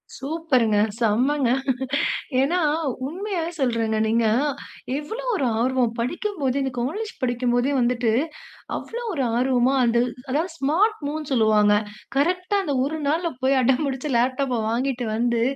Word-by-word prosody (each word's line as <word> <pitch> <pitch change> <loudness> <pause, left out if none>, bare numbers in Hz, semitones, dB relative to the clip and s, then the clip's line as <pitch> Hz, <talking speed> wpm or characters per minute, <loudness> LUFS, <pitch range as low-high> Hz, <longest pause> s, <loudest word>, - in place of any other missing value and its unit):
சூப்பர்ங்க. 270 -7 +1 0.2
செம்மங்க. 245 +4 +2 0.9
ஏன்னா 340 +7 +1 0.5
உண்மையாவே 350 0 -3
சொல்றேங்க. 230 -4 +1
நீங்க 230 +1 +2 0.7
எவ்வளவு 455 +12 -5
ஒரு 275 - 0 0.2
ஆர்வம்? 255 -2 +1
படிக்கும்போதே 280 - -1
இந்த 265 - -2
காலேஜ் 405 - -3
படிக்கும் 245 -1 0
போதே 245 +3 +2
வந்துட்டு, 240 -2 +1 0.7
அவ்வளோ 475 +1 -6
ஒரு 275 -6 -1
ஆர்வமா 255 +1 +2
அந்த 235 0 +2 0.3
அதாவது 320 +7 0
ஸ்மார்ட் 365 +11 +2
மூவ்ன்னு 300 -1 -4
சொல்லுவாங்க. 215 -3 +4 0.4
கரெக்ட்டா 365 +6 +1
அந்த 290 -6 -1
ஒரு 310 +4 -2
நாள்ல 330 +4 +1
போய், 270 +1 +3
அடம் 260 +3 +2
புடுச்சு 270 +2 -3
லேப்டாப்ப 255 0 +1
வாங்கிட்டு 250 +1 -1
வந்து, 235 0 +1
265 Hz, 125 wpm, -23 LUFS, 240-320 Hz, 0.9 s, சொல்லுவாங்க